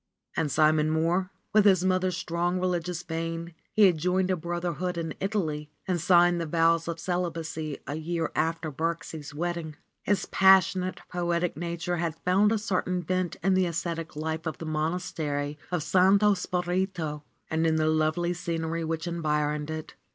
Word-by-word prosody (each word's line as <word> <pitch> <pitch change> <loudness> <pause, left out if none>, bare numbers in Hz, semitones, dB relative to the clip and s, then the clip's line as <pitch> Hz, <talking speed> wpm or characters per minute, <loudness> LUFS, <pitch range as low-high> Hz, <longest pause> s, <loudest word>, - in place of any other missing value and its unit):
And 150 -3 0
Simon 155 0 +4
Mohr?* 170 +4 +1 0.2
With 215 -1 +5
his 185 -3 +5
mother's 185 -1 +1
strong 175 +1 -1
religious 180 -1 -1
vein, 165 0 -4 0.2
he 215 - +4
had 175 -5 +4
joined 180 +3 +1
a - - +2
brotherhood 175 +1 -3
in 165 -2 -3
Italy 160 -7 -2 0.2
and 180 -3 0
signed 175 0 +5
the 165 - -3
vows 165 +1 +2
of 165 -1 -3
celibacy 165 -4 -3
a 140 - -4
year 160 +1 -2
after 160 0 -1
Birksie's 160 -1 -4
wedding. 170 -1 -3 0.3
His 205 -1 0
passionate, 190 -1 +4
poetic 175 -1 -1
nature 170 +1 -3
had 165 -2 -1
found 195 +4 +4
a 225 - +2
certain 185 -3 -1
vent 185 0 -1
in 195 +1 +3
the 185 -1 +3
ascetic 165 -1 -3
life 160 +2 -3
of 160 - -3
the 165 - -7
Monastery 155 -2 -2
of 175 -4 0
Santo 195 +4 +5
Spirito 180 -4 -2 0.3
and 160 +1 +2
in 160 - +2
the 155 0 +2
lovely 155 +3 +1
scenery 165 -1 -2
which 160 0 -2
environed 150 -3 -1
it. 155 0 -5
170 Hz, 160 wpm, -27 LUFS, 160-180 Hz, 0.3 s, With